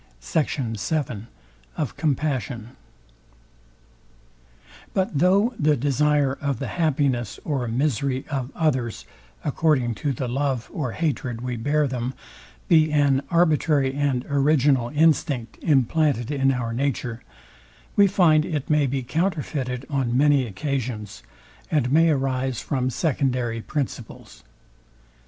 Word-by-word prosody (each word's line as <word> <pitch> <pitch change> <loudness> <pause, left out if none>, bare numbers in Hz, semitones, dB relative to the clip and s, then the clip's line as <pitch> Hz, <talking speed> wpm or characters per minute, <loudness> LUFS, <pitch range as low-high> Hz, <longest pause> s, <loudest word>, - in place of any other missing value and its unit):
SECT. 145 - -1 0.2
VII 125 -4 -2 0.5
OF 150 -5 -2
COMPASSION 130 -6 -2 2.2
But 190 -4 0
though 200 - +3
the 150 0 +3
desire 145 +1 +2
of 140 -3 -1
the - - -4
happiness 135 - 0
or 135 -5 -1
misery 130 +2 -1
of 135 -3 -3
others, 130 -8 -1 0.4
according 145 -5 +1
to 145 - 0
the 130 0 -3
love 130 -1 -2
or 130 -7 -3
hatred 130 -7 -2
we 125 0 -3
bear 145 +5 +1
them, 125 0 -3 0.5
be 155 -2 +4
an 140 -2 +3
arbitrary 155 -5 +2
and 135 -3 0
original 140 -3 +2
instinct 145 -6 +1
implanted 140 -3 +2
in 135 -2 +2
our 120 -3 -2
nature, 125 -2 -2 0.7
we 200 -1 +6
find 170 -6 +4
it 155 -3 -3
may 150 -2 +3
be 135 0 -2
counterfeited 140 -4 -2
on 130 -4 0
many 140 -2 +4
occasions, 110 -2 -4 0.5
and 135 -5 +1
may 165 +3 +5
arise 135 -3 0
from 130 -3 -1
secondary 125 -5 -1
principles. 130 -4 -6
135 Hz, 115 wpm, -24 LUFS, 125-150 Hz, 2.2 s, we